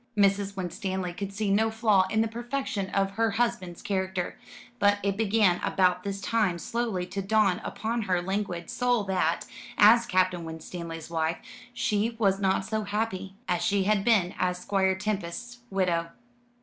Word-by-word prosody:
Mrs. 200 0 +2
Winstanley 185 0 -3
could 200 +2 -5
see 200 0 -1
no 220 +3 +3
flaw 215 -4 +3
in 220 +2 +2
the 225 - +2
perfection 240 -3 -3
of 195 0 +1
her 225 +3 +1
husband's 230 -8 -1
character; 190 -2 -2 0.4
but 205 0 +4
it 200 -1 +1
began 205 -4 +3
about 180 -1 +2
this 200 0 -3
time 200 -3 +1
slowly 220 -1 -2
to 195 +2 -4
dawn 200 -2 +2
upon 230 +2 -2
her 185 -4 +1
languid 180 -2 -3
soul 245 -3 +1
that, 185 -4 0 0.3
as 230 +3 +7
Captain 185 -3 +1
Winstanley's 165 0 -7
wife, 160 0 0 0.3
she 225 -1 0
was 195 -3 +2
not 190 -1 +1
so 215 +2 -1
happy 200 -2 -3
as 175 -1 0
she 200 -2 +2
had 205 0 +2
been 200 -6 +3
as 180 0 +1
Squire 190 0 +1
Tempest's 210 +4 -4
widow. 175 -4 0
195 Hz, 160 wpm, -27 LUFS, 180-220 Hz, 0.4 s, as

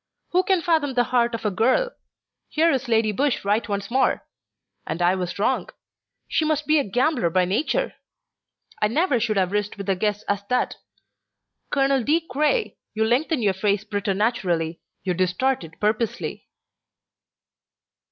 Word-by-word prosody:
Who 360 - +4
can 370 -2 +1
fathom 310 -6 +1
the 245 - +4
heart 240 -1 +3
of 225 - -7
a 210 - +2
girl! 260 - +2 0.6
Here 325 +2 +3
is 265 -1 -1
Lady 225 -2 +2
Busshe 265 +1 0
right 210 +3 +1
once 200 +1 -3
more! 265 +2 +2 0.6
And 160 - -3
I 175 +1 +3
was 180 -2 -3
wrong. 235 +6 0 0.6
She - - +1
must 305 -1 0
be 310 0 +4
a - - +1
gambler 245 - +1
by 180 +2 +2
nature. 305 - 0 0.9
I 210 - +4
never 280 - +1
should 215 -2 0
have 185 -1 +1
risked 205 0 -2
such 200 -1 -6
a - - +4
guess 210 +2 -1
as 200 0 -2
that. 250 - 0 0.9
Colonel 275 -2 +2
De 305 +7 +3
Craye, 310 - 0 0.2
you 220 0 +2
lengthen 255 +3 +1
your 200 -2 +3
face 200 +1 0
preternaturally, 195 -5 -1 0.2
you 185 - 0
distort 185 +8 0
it 165 0 -12
purposely." 215 +2 -1
225 Hz, 160 wpm, -23 LUFS, 200-275 Hz, 0.9 s, Who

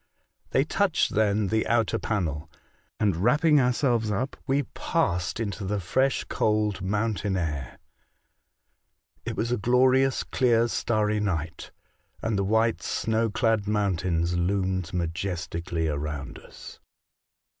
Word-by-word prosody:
They 135 - +3
touched 190 +3 +1
then 105 -1 +2
the 110 0 +1
outer 115 -2 +1
panel, 80 -7 -2 0.5
and, 100 -6 +1
wrapping 150 - +4
ourselves 125 -3 +1
up, 120 +7 -2
we 140 +1 +2
passed 85 -5 -1
into 105 -2 -3
tbe 100 +2 -1
fresh, 130 +9 +1
cold, 105 -2 0
mountain 105 -1 -1
air. 75 -7 -3 1.5
It - - -3
was 120 +2 -1
a 125 - +1
glorious, 130 +4 +3
clear, 120 -3 +2
starry 105 -3 0
night, 85 -6 -3 0.5
and 110 -1 -1
the 100 - +1
white, 110 +3 +1
snow 115 0 0
clad 110 -1 +1
mountains 90 -5 0
loomed 95 0 -1
majestically 85 -1 -3
around 75 -2 -4
us. - - -13
105 Hz, 120 wpm, -26 LUFS, 90-115 Hz, 1.5 s, wrapping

